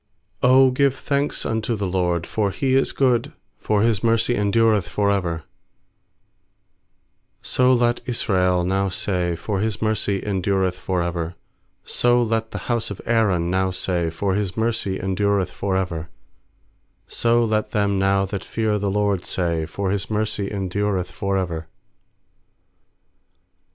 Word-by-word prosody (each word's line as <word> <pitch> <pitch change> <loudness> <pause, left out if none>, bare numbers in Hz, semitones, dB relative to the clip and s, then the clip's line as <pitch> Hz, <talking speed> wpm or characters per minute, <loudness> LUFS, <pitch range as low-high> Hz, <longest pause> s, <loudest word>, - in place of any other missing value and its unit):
1 125 - +3
1 - - +6
ft 135 - +8
'0 130 - +3
give 135 +1 +2
thanks 140 +2 -1
unto 110 +1 -1
the 100 -2 -2
LORD. 90 -2 0
1X0 - - -6
for 105 -2 0
He 130 +6 -1
is 135 - +2
good, 125 -4 +1 0.3
For 105 -1 +1
His 115 -2 +1
mercy 115 +1 +2
endureth 105 -1 +2
for 100 -1 +1
ever/ 85 -5 -1 2.0
2So 125 -1 +3
let 120 0 +1
Israel 90 -7 +1
now 95 +2 0
say, 90 -3 -1
For 100 +4 -3
His 110 +1 -1
mercy 110 -2 0
endureth 95 -2 0
for 90 -2 -1
ever. 85 0 -3 0.5
8So 120 -1 +2
let 110 0 -1
the - - -6
bouse 120 -2 0
of 100 - -7
Aaron 100 -7 +2
now 95 0 +1
say, 90 -2 -1
For 95 +4 -1
His 100 -1 -2
mercy 110 -4 -1
endureth 95 0 0
for 95 +1 -1
ever. 85 -4 -3 1.0
4So 120 0 +2
let 110 0 0
them 100 -2 +1
now 95 0 +2
that 95 0 -5
fear 110 -2 -1
the* 100 0 -1
LORD 100 -2 0
say, 85 -3 -1
For 95 +3 -2
His 100 -1 -2
mercy 105 -2 -1
endureth 100 -1 -2
for 100 -2 -1
ever. 85 -4 -3
100 Hz, 150 wpm, -22 LUFS, 95-110 Hz, 2.0 s, ft